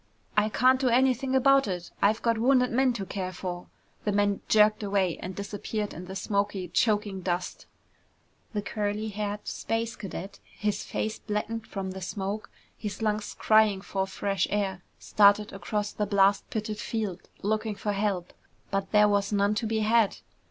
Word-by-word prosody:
"I 210 +1 +3
can't 255 +4 +4
do 260 - +3
anything 260 +2 +2
about 275 -1 +5
it. 180 -2 -4
I've 215 +2 +3
got 230 -1 +2
wounded 250 +1 +4
men 260 +2 +3
to 200 -5 -4
care 185 -1 -4
for!" 180 -1 -6 0.4
The 210 - 0
man 205 0 +1
jerked 215 0 +5
away 195 -4 0
and 185 +1 -5
disappeared 205 +1 -4
in 175 +3 -8
the 190 +1 -7
smoky, 195 -1 -1
choking 205 0 +1
dust. 180 0 -3 0.9
The 205 -1 -2
curly 210 +1 -2
haired 205 0 -4
space 225 0 -2
cadet, 195 0 -7 0.2
his 210 -1 -1
face 220 0 -3
blackened 220 +2 -3
from 190 -2 -4
the 190 0 -7
smoke, 200 +3 -4 0.3
his 210 +1 -5
lungs 210 -1 -1
crying 215 -3 +4
for 195 -1 -2
fresh 195 -1 -1
air, 195 -3 -1 0.2
started 205 0 +4
across 205 +1 -2
the 210 - -2
blast 200 0 +3
pitted 215 -1 -3
field, 215 -5 -4
looking 215 +1 0
for 205 +1 -2
help. 195 -3 -1 0.4
But 195 -1 -1
there 210 0 +6
was 200 0 +1
none 200 0 +2
to 220 +1 -1
be 220 0 0
had. 220 -1 +3
205 Hz, 165 wpm, -28 LUFS, 195-220 Hz, 0.9 s, there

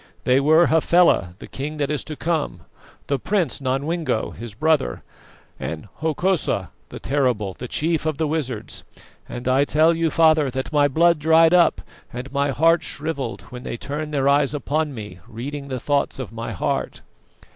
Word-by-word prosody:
They 130 +1 +4
were 155 +4 +5
Hafela, 160 - +3
the - - -10
king 150 +3 -5
that 145 -1 -1
is 150 - -2
to 155 - -6
come, 155 - -2 0.4
the 140 -1 -1
prince 175 -5 -1
Nodwengo, 135 0 -1
his 115 -3 -9
brother, 155 +2 +1 0.6
and 80 +5 -5
Hokosa 160 - 0 0.2
the - - -8
terrible, 125 -8 0
the 125 - -7
chief 160 +4 -1
of 155 -3 -1
the 160 - 0
wizards; 145 -7 -3 0.5
and 120 +1 -6
I 130 +2 +4
tell 155 +3 +3
you, 165 0 +1
father, 155 -3 +4
that 130 +4 -4
my 145 -1 +4
blood 170 +3 +3
dried 160 +2 +5
up 175 -1 +4 0.3
and 125 +3 -7
my 140 0 +1
heart 165 +4 +3
shrivelled 140 -5 -4
when 125 0 -7
they 120 - -5
turned 150 +4 -5
their 140 -2 +1
eyes 140 +1 +3
upon 150 0 -1
me, 105 -5 -8
reading 140 +5 -6
the 130 -2 -4
thoughts 145 +2 0
of 130 -5 -6
my 115 0 -5
heart." 95 - -2
145 Hz, 170 wpm, -22 LUFS, 130-160 Hz, 0.6 s, were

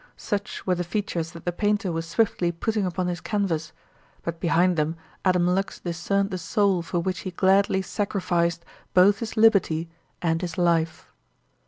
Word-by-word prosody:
Such 205 -1 -4
were 185 - +2
the 175 0 -1
features 175 -3 -3
that 170 - -11
the 175 - +1
painter 205 0 0
was 165 0 -3
swiftly 180 -4 +1
putting 210 +3 -1
upon 180 +1 -2
his 175 -1 -3
canvas; 175 -7 -1 0.5
but 170 0 -4
behind 175 +1 +3
them 155 +1 0 0.3
Adam 180 -2 +3
Lux 190 +2 0
discerned 195 +4 -1
the 185 - -3
soul 195 -1 +1
for 170 +1 -3
which 180 0 -2
he 185 - -5
gladly 190 +1 +3
sacrificed 175 -5 -1 0.3
both 195 +3 +6
his 225 -1 -5
liberty 185 -7 +3 0.3
and 165 -1 0
his 175 -3 -4
life. 165 -2 +1
180 Hz, 165 wpm, -25 LUFS, 170-200 Hz, 0.5 s, both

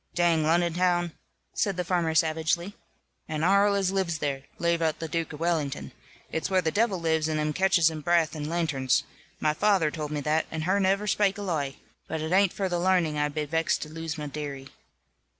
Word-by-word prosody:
"Dang 170 -2 +3
Lonnon 170 +2 +2
town," 175 -1 +1 0.4
said 195 -3 0
the 180 - 0
farmer, 170 -2 0
savagely, 160 +4 +1 0.5
"and 155 0 -1
arl 200 +2 +4
as 195 -2 +1
lives 190 -4 0
there, 140 -3 -2 0.2
lave 170 0 +1
out 160 -1 +1
the 165 - -5
Duke 165 +1 -2
of 150 - -8
Wellington. 160 -5 -1 0.4
It's 160 - -2
where 190 -1 +3
the 160 - +1
devil 205 -1 +1
lives, 160 -1 +1
and 155 -1 -1
'em 150 0 0
catches 180 -3 +4
his 155 -1 -6
braath 170 0 +2
in 150 0 -4
lanterns. 145 -7 +1 0.4
My 155 -1 +2
faather 185 -4 +2
tould 150 -2 -4
me 150 -1 -3
that, 155 +2 0
and 155 0 -4
her 190 +4 +2
niver 195 +2 +2
spak 205 -1 +2
a 205 - -5
loi. 145 -8 -2 0.3
But 160 - -3
it 160 +1 -3
hain't 195 0 +4
for 195 - -2
the 175 -1 -1
larning 175 -4 +2
I 150 0 +1
be 150 +1 -3
vexed 160 +2 0
to 155 - -9
lose 160 0 -5
my 150 - -4
dearie." 140 -2 -6
165 Hz, 210 wpm, -27 LUFS, 155-180 Hz, 0.5 s, arl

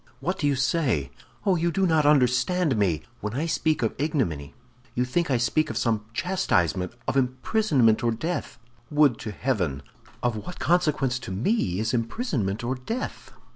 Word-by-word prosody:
"What 180 +8 -2
do 145 - +1
you 140 - +2
say? 130 - +1 0.3
Oh, 195 -2 +4
you 170 +1 +1
do 190 +3 +1
not 160 -4 +3
understand 140 +3 +3
me! 95 -8 +1 0.2
When 105 +2 -4
I 150 +5 0
speak 155 -4 0
of 110 - +1
ignominy, 120 - -1 0.4
you 125 - +1
think 165 +6 0
I 130 - +3
speak 150 +6 +1
of - - -3
some 110 -3 0
chastisement, 100 - 0
of - - 0
imprisonment 130 - +2
or 120 - +2
death. 160 +10 -3 0.3
Would 145 -6 +3
to 110 - -5
heaven! 95 - -1 0.4
Of 120 -2 +1
what 180 +12 -7
consequence 150 -7 +1
to 95 - -7
me 100 - 0
is 110 +3 -1
imprisonment 115 - -1
or 120 +2 0
death?" 175 - -5
130 Hz, 170 wpm, -26 LUFS, 110-160 Hz, 0.4 s, Oh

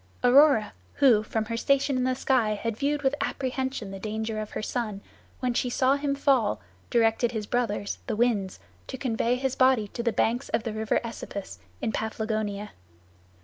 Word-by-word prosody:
Aurora, 255 -3 +5 0.2
who 245 -6 +5
from 220 0 -2
her 230 +1 -3
station 275 +3 +2
in 255 0 +1
the 255 0 +1
sky 250 -5 +1
had 230 +1 -3
viewed 290 +4 -1
with 265 0 +2
apprehension 260 -5 -2
the 195 - -7
danger 220 +1 -3
of 215 - -6
her - - -3
son, 215 -4 -3 0.4
when 250 -1 0
she 250 +1 0
saw 260 +2 +3
him 285 0 -1
fall, 260 - +2 0.3
directed 230 +1 +2
his 215 -2 -3
brothers, 210 -3 -1
the 225 - -1
Winds, 210 -5 0 0.3
to 260 - -6
convey 240 -1 0
his 265 0 -1
body 255 -5 +4
to 235 - -5
the 235 0 +1
banks 235 +4 0
of 225 -1 0
the 225 - -3
river 220 0 0
Esepus 215 -3 -7 0.2
in - - 0
Paphlagonia. 215 -2 -3
235 Hz, 180 wpm, -27 LUFS, 215-260 Hz, 0.4 s, Aurora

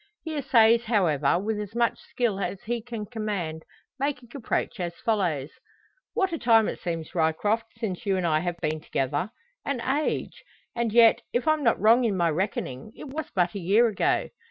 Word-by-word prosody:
He 320 -1 -4
essays, 235 -4 +4
however, 170 - +2
with 210 +3 -2
as 210 +1 -6
much 235 0 +1
skill 230 -6 -2
as 195 -1 -4
he 235 +1 -2
can 230 -2 -6
command, 205 -8 -4 0.4
making 265 -4 -2
approach 245 -3 -2
as 175 -1 -3
follows: 170 -10 -1 0.6
"What 380 -3 +1
a 330 - -2
time 225 -2 +4
it - - -4
seems, 165 -3 -4
Ryecroft, 185 +8 +1
since 210 -6 -4
you 195 -2 +1
and 185 - -1
I 155 -2 +2
have 175 +1 -3
been 155 -1 -2
together 155 +8 -1 0.3
an 280 -3 -2
age! 275 +6 -2 0.3
And 235 -2 0
yet, 230 +1 +6
if 245 +3 0
I'm 310 -1 +3
not 230 - +3
wrong 230 +5 +5
in 210 -5 +1
my 170 -2 +2
reckoning, 170 -2 -3
it 290 - -9
was 305 +2 -5
but 175 -2 +2
a 200 - -4
year 200 +7 +4
ago. 205 - 0
215 Hz, 185 wpm, -26 LUFS, 175-240 Hz, 0.6 s, yet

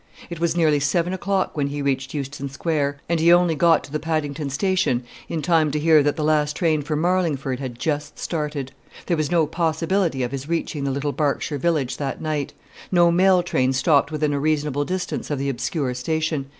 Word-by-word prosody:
It 170 - -5
was 170 0 0
nearly 155 -3 +3
seven 170 +6 0
o'clock 190 0 -1
when 145 -2 0
he 145 0 -4
reached 135 0 -1
Euston 140 0 -4
Square; 145 0 -1
and 170 -1 +1
he 165 +2 +5
only 175 -1 +5
got 165 +1 +3
to - - -12
the 150 - -2
Paddington 150 -2 -2
station 145 -4 0 0.3
in 160 -2 -3
time 160 -2 +3
to 150 +1 -1
hear 155 0 +5
that 145 0 +1
the 155 - -2
last 150 -1 +2
train 160 -4 +1
for 150 +2 -3
Marlingford 155 -6 0
had 130 -3 -6
just 150 +1 -3
started. 150 -5 -3 0.3
There 175 - +1
was 155 -2 -1
no 170 -2 +3
possibility 165 -2 0
of 120 - -2
his 140 +2 -5
reaching 160 -4 -2
the - - 0
little 140 +2 -1
Berkshire 145 0 -1
village 150 -4 0
that 140 -2 -3
night. 155 -3 -2 0.4
No 175 -2 +5
mail 185 +1 +4
train 130 -6 +1
stopped 140 +3 +3
within 150 -1 0
a 140 - 0
reasonable 145 -1 0
distance 185 +2 -3
of 145 - -1
the 140 +1 -1
obscure 125 +1 -2
station. 155 +2 -2
150 Hz, 200 wpm, -22 LUFS, 140-165 Hz, 0.4 s, he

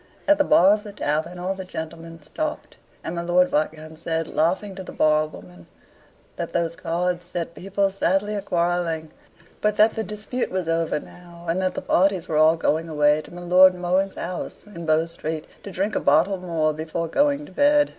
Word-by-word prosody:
At 300 0 +5
the - - +5
bar 190 -8 +6
of 210 0 -2
the 205 - -9
tavern 160 0 -2
all 180 +2 -2
the 190 0 -7
gentlemen 165 -2 -8
stopped, 305 - -5 0.3
and 165 - -4
my 170 - -2
Lord 175 +1 +3
Viscount 155 +1 -2
said, 165 -1 -2
laughing, 190 +5 0
to 190 - -7
the 185 - -8
barwoman, 150 - -1 0.7
that - - -4
those 170 -1 0
cards 175 +1 -2
set 170 -1 -4
people 195 +2 0
sadly 195 +2 0
a 205 - -2
quarrelling; 170 -3 -1 0.5
but 210 0 +1
that 215 +1 +5
the 220 - -2
dispute 215 +4 -4
was 185 -2 -2
over 165 -2 0
now, 175 +1 -14
and 170 +3 0
the 185 0 -1
parties 190 -2 +2
were 155 - -1
all 155 +1 +6
going 165 0 0
away 150 0 +3
to - - -15
my 175 0 -9
Lord 185 +1 +6
Mohun's 185 +2 0
house, 180 +1 -6
in 170 -6 -9
Bow 155 +1 +3
Street, 160 -2 -5 0.2
to - - -8
drink 195 +3 -2
a - - +2
bottle 165 +7 +3
more 165 -4 0
before 160 +2 -3
going 285 - +1
to - - -14
bed. 290 +6 +4
175 Hz, 195 wpm, -23 LUFS, 160-195 Hz, 0.7 s, bar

